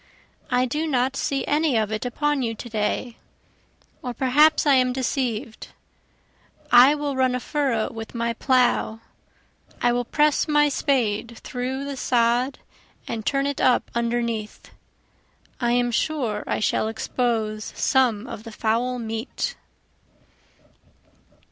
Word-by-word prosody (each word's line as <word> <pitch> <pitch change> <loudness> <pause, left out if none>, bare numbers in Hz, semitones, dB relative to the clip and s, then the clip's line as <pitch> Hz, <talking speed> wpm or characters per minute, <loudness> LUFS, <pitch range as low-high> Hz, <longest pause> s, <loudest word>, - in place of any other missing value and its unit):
I 250 0 +2
do 300 +6 -2
not 260 -2 +1
see 275 0 -1
any 295 -4 +2
of 215 -1 0
it 215 +3 -2
upon 295 +3 0
you 225 -2 -2
to 240 - -9
day, 220 +2 -2 0.8
or 245 -1 -5
perhaps 290 +6 +4
I 285 - +5
am 255 -1 +3
deceiv'd, 255 -3 -2 1.0
I 255 +4 +8
will 290 -2 -3
run 260 -1 +2
a - - -1
furrow 265 -5 -1
with 225 +1 -8
my 235 0 -1
plough, 245 -3 +1 0.8
I 240 - +3
will 245 0 0
press 300 +4 +2
my 295 -1 +4
spade 235 -6 0
through 260 +2 -4
the 280 -1 -5
sod 245 +2 +1 0.5
and 225 -2 -4
turn 275 0 +1
it 280 -1 -2
up 250 -1 +2
underneath, 235 -2 -2 0.9
I 240 -1 +1
am 245 0 +2
sure 235 -5 -1
I - - -1
shall 215 - +1
expose 220 -1 -2
some 245 -5 +2
of 220 - -8
the 225 - -9
foul 235 +4 0
meat. 225 +1 -4
245 Hz, 135 wpm, -23 LUFS, 230-270 Hz, 1.0 s, I